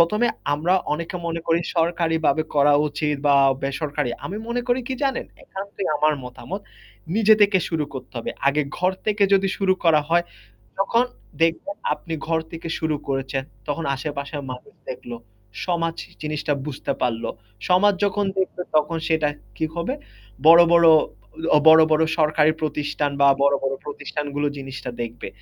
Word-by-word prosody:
১ম 190 +7 +3
এ - - +2 0.3
আমরা 165 +5 +1 0.2
অনেকে 170 +4 -3
মনে 165 0 -2
করি 165 +1 +2 0.2
সরকারিভাবে 160 -2 +1
করা 145 0 +5 0.2
উচিত 150 0 -1
বা 140 - +5 0.3
বেসরকারি। 140 -2 -2 0.2
আমি 200 - -5
মনে 245 +1 -1
করি 245 +1 +2
কি 260 - -1
জানেন, 270 -2 0 0.2
একান্তই 195 0 -6
আমার 155 0 +3
মতামত। 180 +10 -7 0.5
নিজে 220 0 +6
থেকে 205 -2 +5
শুরু 160 -3 -1
করতে 130 - -8
হবে। 115 - -4 0.2
আগে 150 +2 +2
ঘর 185 +1 +1
থেকে 210 -1 +1
যদি 195 0 +2
শুরু 190 -1 +2
করা 160 -3 +5
হয় 170 +1 +3 0.6
তখন 230 +5 +3 0.4
দেখবেন 165 - +1 0.2
আপনি 165 - -7
ঘর 165 -1 +1
থেকে 165 0 -7
শুরু 160 -1 0
করেছেন 135 0 -2 0.2
তখন 150 +3 -2
আশেপাশের 140 +1 -5
মানুষ 125 +12 -10 0.2
দেখলো। 120 -1 -6 0.5
সমাজ 165 -2 -1 0.2
জিনিসটা 150 -1 -1
বুঝতে 150 -3 -4
পারল। 120 -2 0 0.5
সমাজ 205 +3 +5
যখন 205 0 0
দেখবে 190 -1 -1
তখন 155 +2 +2
সেটা 160 -2 +2 0.3
কি 160 - 0
হবে 170 +10 -2 0.5
বড়, 165 +1 +9
বড় 170 -1 +6 0.7
অ - - +8
বড়, 160 0 +9
বড় 155 +1 +4 0.2
সরকারি 155 0 +4
প্রতিষ্ঠান 145 -1 -1
বা 140 - +7
বড়, 140 0 +4
বড় 135 - 0
প্রতিষ্ঠানগুলো 145 0 -3
জিনিসটা 135 -2 -6
দেখবে। 115 0 -6
160 Hz, 155 wpm, -23 LUFS, 145-180 Hz, 0.7 s, বড়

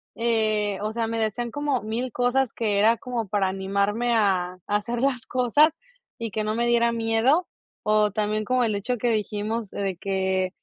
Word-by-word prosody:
eh, 215 -3 +1
o 215 +1 -2
sea, 225 0 -1
me 230 0 -2
decían 230 +2 -2
como 290 -2 -1
mil 230 +4 -3
cosas 245 +2 +1
que 210 -3 0
era 225 +3 +4
como 235 -3 -4
para 200 -1 +1
animarme 200 +5 0
a 190 -5 +1
a 205 - 0
hacer 235 +3 -1
las 255 -2 0
cosas 290 +6 +3 0.4
y 230 -2 -4
que 215 +2 -2
no 215 +1 -1
me 235 +1 +1
diera 235 0 +3
miedo, 230 +9 +2 0.4
o 210 0 +3
también 215 +1 -1
como 250 +3 +1
el 215 -2 0
hecho 240 +5 -2
que 240 - -1
dijimos 215 0 -2
de 195 -1 -3
que, 190 0 -1
220 Hz, 185 wpm, -25 LUFS, 205-240 Hz, 0.4 s, era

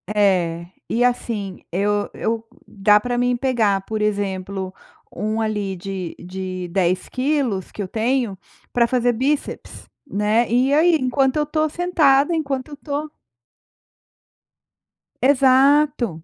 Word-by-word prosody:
É. 175 -5 +2 0.2
E, 240 - +1
assim, 225 -6 -1
eu 205 +3 0
eu 225 0 -2 0.2
dá 210 +1 +4
pra 245 +2 -2
mim 245 0 +2
pegar, 230 -7 +1
por 215 +2 -4
exemplo, 195 -2 -2 0.4
um 215 +1 -2
ali 210 -3 -2
de 185 -1 -6
de 185 0 -5
10 185 0 0
quilos, 255 -8 -1
que - - -6
eu 195 - -3
tenho, 230 0 -1 0.4
pra 235 -1 +3
fazer 245 0 +1
bíceps, 275 +5 -3 0.2
né, 210 +3 +1
e 255 +3 +3
aí 330 +3 +5
enquanto 265 0 +1
eu 300 - +2
estou 310 +1 0
sentada, 315 -3 +3
enquanto 275 -4 -2
eu - - -10
estou 295 +1 -5 2.1
Exato. 265 - +3
230 Hz, 125 wpm, -21 LUFS, 195-270 Hz, 2.1 s, aí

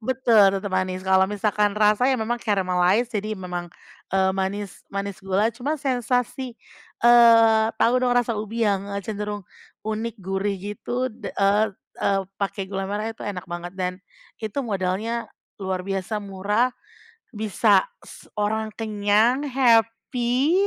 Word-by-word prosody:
Betul 225 -5 +4
tetep 195 0 -5
manis. 185 0 -1
Kalau 190 0 +4
misalkan 210 0 0
rasa 215 +4 +4
ya 265 - +3
memang 235 +1 -2
caramalize, 195 +3 +1
jadi 215 0 -2
memang, 180 -2 -5 0.4
eee, 190 0 +3
manis 195 +1 -3
manis 200 -1 -4
gula 195 +4 +1
cuma 270 +7 -2
sensasi, 250 -2 -1 0.5
eee, 230 -2 +7
tau 235 +2 +3
dong 250 -1 +2
rasa 245 -1 +2
ubi 220 +1 -2
yang 200 -1 0 0.2
cenderung 210 -1 -4 0.4
unik 220 +2 -3
gurih 195 +1 -1
gitu 220 +6 -3
d - - -7
eee 205 +2 +3 0.3
eee, 195 0 +2 0.2
pake 200 0 -2
gula 195 0 -4
merah 210 +3 -2
itu - - -30
enak 185 -3 -5
banget. 175 0 -6
Dan, 185 0 -3 0.4
itu 220 +3 -6
modalnya 210 +3 -2 0.3
luar 185 -1 -2
biasa 195 +2 -2
murah, 205 +4 0 0.6
bisa 215 0 +3 0.2
se - - -14
orang 220 +1 0
kenyang 215 +3 +2
happy, 245 +3 +2
210 Hz, 135 wpm, -24 LUFS, 195-230 Hz, 0.6 s, eee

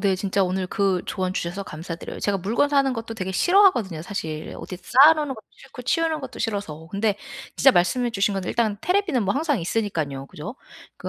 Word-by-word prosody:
네 195 -2 +2
진짜 195 +1 0
오늘 185 0 -1
그 195 -2 0
조언 185 -1 -2
주셔서 180 +2 -3
감사드려요. 165 +1 -7
제가 205 -1 +1
물건 225 +10 +1
사는 275 -2 +3
것도 225 -1 -5
되게 190 -3 -4
싫어하거든요 240 - +3
사실. 160 -5 -5
어디 180 - -7
쌓아 275 - +6
놓는 295 -4 -2
것도 220 - -14
싫고 250 - -12
치우는 320 +4 0
것도 260 -2 -8
싫어서. 165 -7 -4
근데 205 0 0 0.4
진짜 270 - +7
말씀해 240 +6 +2
주신 200 -1 +1
건데 190 -2 -3
일단 215 -3 0
텔레비전은 360 - +1
뭐 200 +3 0
항상 290 - 0
있으니깐요. 160 -9 -2
그쵸? 175 - -8 0.4
그 - - -6
205 Hz, 440 characters per minute, -24 LUFS, 185-255 Hz, 0.4 s, 진짜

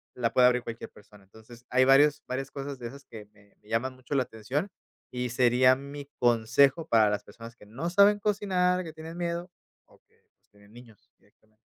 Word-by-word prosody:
la 115 -2 -1
puede 125 - +5
abrir 125 0 +2
cualquier 115 -1 -8
persona. 105 -1 -19
Entonces, 110 +4 -17
hay 130 +1 +3
varios 140 +2 +4
varias 135 +2 -5
cosas 140 -1 -7
de 120 - -6
esas 140 +3 -12
que 105 -2 -12
que 105 -1 -26
me 105 - -22
llaman 130 +3 -2
mucho 130 +2 -8
la 135 - +2
atención 125 - -4 0.4
y 125 0 -3
sería 125 +1 +4
mi 140 +1 -9
consejo 120 +6 +3
para 110 -2 +4
las 105 0 -3
personas 115 +2 -13
que 105 - -18
no 120 +11 -5
saben 200 +3 +4
cocinar, 185 -3 0
que 160 -2 -9
tienen 160 +1 -10
miedo 175 +1 -4 0.4
o - - -24
que - - -35 0.3
tienen 100 +1 -22
niños 120 -3 -17
directamente. 110 0 -33
125 Hz, 195 wpm, -27 LUFS, 115-145 Hz, 0.4 s, puede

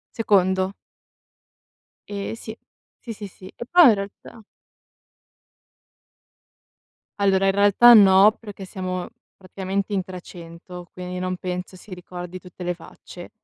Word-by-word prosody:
Secondo. 190 -4 +1 1.4
Ehm 200 +1 -5
sì, 220 -1 -9 0.4
sì, 230 -2 -8
sì, 205 -1 -9
sì. 185 0 -16
E 240 - -8
poi 345 0 +6
in - - +5
realtà 200 +2 -9 2.8
Allora, 195 -1 +2
in 195 - +3
realtà 205 +4 +6
no, 200 0 +7
perché 205 -3 -10
siamo 185 -1 -5 0.3
praticamente 195 +2 -4
in 190 -2 0
300 175 -1 -11
quindi 180 0 -7
non 185 0 -3
penso 180 +1 -6
si 185 +1 -12
ricordi 180 0 -9
tutte 180 0 -12
le 180 0 -1
facce. 175 +1 -13
190 Hz, 120 wpm, -22 LUFS, 180-205 Hz, 2.8 s, no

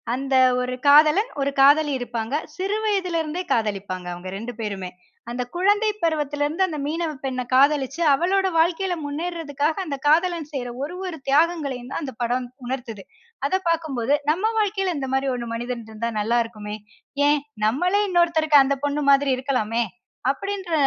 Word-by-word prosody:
அந்த 270 +1 -1 0.3
ஒரு 250 0 -3
காதலன், 305 +10 +6
ஒரு 275 +1 +1
காதலி 290 +2 +6
இருப்பாங்க. 235 +2 -3 0.2
சிறு 395 +3 -1
வயதில 380 -5 0
இருந்தே, 320 +3 -4
காதலிப்பாங்க 195 -4 -3
அவங்க 175 +1 -9
2 240 +2 -6
பேருமே. 195 -4 -4 0.4
அந்த 245 +1 -2
குழந்தை 410 +4 +3
பருவத்தில 295 -3 0
இருந்து, 330 +6 0
அந்த 310 -3 -5
மீனவப்பெண்ணை 290 -5 -3
காதலிச்சு 280 +2 +3
அவளோட 380 +6 +2
வாழ்க்கையில 355 +3 +1
முன்னேறதுக்காக 305 -1 -2
அந்த 280 -3 -4
காதலன் 330 0 +2
செய்யுற 255 -4 -4
ஒரு 325 +5 -5
ஒரு 355 -3 -5
தியாகங்களையும் 280 -4 +1
தான் - - -3
அந்த 265 -2 -5
படம் 245 +1 0 0.2
உணர்த்துது. 240 -5 -5 0.4
அத - - -6 0.2
பார்க்கும்போது, 290 -6 0
நம்ம 380 +9 +1
வாழ்க்கையில 390 -4 0
இந்த 265 -2 -3
மாரி 270 0 +1
ஒண்ணு 240 -1 -4
மனிதன் 240 -1 -4
இருந்தா 220 +2 -3
நல்லா 230 +3 +2
இருக்குமே. 210 -2 -7 0.5
ஏன் 295 0 +3 0.2
நம்மளே 360 - +2
இன்னொருத்தருக்கு 330 -5 +4
அந்த 275 +1 0
பொண்ணு 290 +1 -1
மாதிரி 275 0 +4
இருக்கலாமே! 235 -4 0 0.5
அப்டின்ற 390 0 -5
290 Hz, 150 wpm, -23 LUFS, 250-340 Hz, 0.5 s, காதலன்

